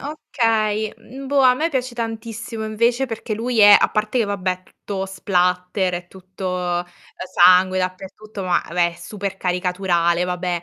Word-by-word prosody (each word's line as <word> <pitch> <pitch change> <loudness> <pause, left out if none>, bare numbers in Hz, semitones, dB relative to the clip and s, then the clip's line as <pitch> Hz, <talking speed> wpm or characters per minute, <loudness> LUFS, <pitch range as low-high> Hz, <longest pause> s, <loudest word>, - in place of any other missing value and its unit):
okay. 220 -7 -1
Mhmm, 270 +3 -11
boh, 280 +1 +2
a 255 -1 +6
me 315 +6 0
piace 255 -3 -2
tantissimo 225 -1 -5
invece 235 +4 +1
perché 225 -2 -4
lui 235 +2 -2
è 205 -1 +9
a - - +2
parte 215 +3 -1
che 230 - +3
vabbè, 200 -2 -2
è 185 0 -10
tutto 195 +1 -6
splatter, 180 0 0
è 175 0 -6
tutto, 180 -1 -4
ehm, - - -7 0.5
sangue 185 +1 +6
dappertutto, 190 +2 -5
ma, 180 -1 +1
vabbè, 170 0 +1
è - - -14
super 195 +2 -6
caricaturale, 180 -2 0
vabbè 180 -1 -2
195 Hz, 165 wpm, -21 LUFS, 180-225 Hz, 0.5 s, è